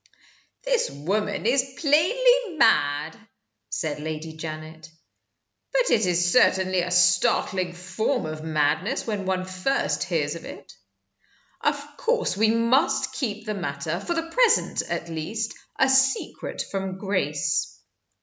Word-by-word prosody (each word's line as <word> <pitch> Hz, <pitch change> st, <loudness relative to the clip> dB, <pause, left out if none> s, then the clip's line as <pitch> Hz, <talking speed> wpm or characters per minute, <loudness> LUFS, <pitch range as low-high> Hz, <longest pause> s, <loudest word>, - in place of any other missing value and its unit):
"The 470 Hz, -, -1 dB
woman 210 Hz, +3 st, -1 dB
is 260 Hz, +2 st, +1 dB
plainly 440 Hz, -, +3 dB
mad," 150 Hz, -, +3 dB, 0.5 s
said 150 Hz, +8 st, -3 dB
Lady 155 Hz, +1 st, -5 dB
Janet. 155 Hz, 0 st, -8 dB, 0.8 s
"But -, -, +2 dB
it 215 Hz, -4 st, +3 dB
is 175 Hz, 0 st, +2 dB
certainly 185 Hz, -5 st, +3 dB
a 175 Hz, -, -3 dB
startling 180 Hz, 0 st, +2 dB
form 185 Hz, +8 st, -2 dB
of 155 Hz, 0 st, -6 dB
madness 160 Hz, -, 0 dB
when 205 Hz, -4 st, -3 dB
one 185 Hz, -1 st, -1 dB
first 185 Hz, +9 st, -1 dB
hears -, -, -1 dB
of -, -, -8 dB
it. -, -, -10 dB, 0.9 s
Of -, -, 0 dB
course 480 Hz, -, 0 dB
we 215 Hz, +2 st, +3 dB
must 255 Hz, +3 st, +2 dB
keep 220 Hz, -6 st, -3 dB
the 215 Hz, -, -2 dB
matter, 160 Hz, -3 st, -3 dB
for 345 Hz, -, -3 dB
the 330 Hz, 0 st, -3 dB
present 480 Hz, 0 st, +3 dB
at -, -, -3 dB
least, 190 Hz, +8 st, -4 dB, 0.2 s
a 265 Hz, -, +4 dB
secret 265 Hz, 0 st, +1 dB
from 195 Hz, -1 st, -3 dB
Grace." 150 Hz, -7 st, -1 dB
190 Hz, 130 wpm, -25 LUFS, 160-265 Hz, 0.9 s, a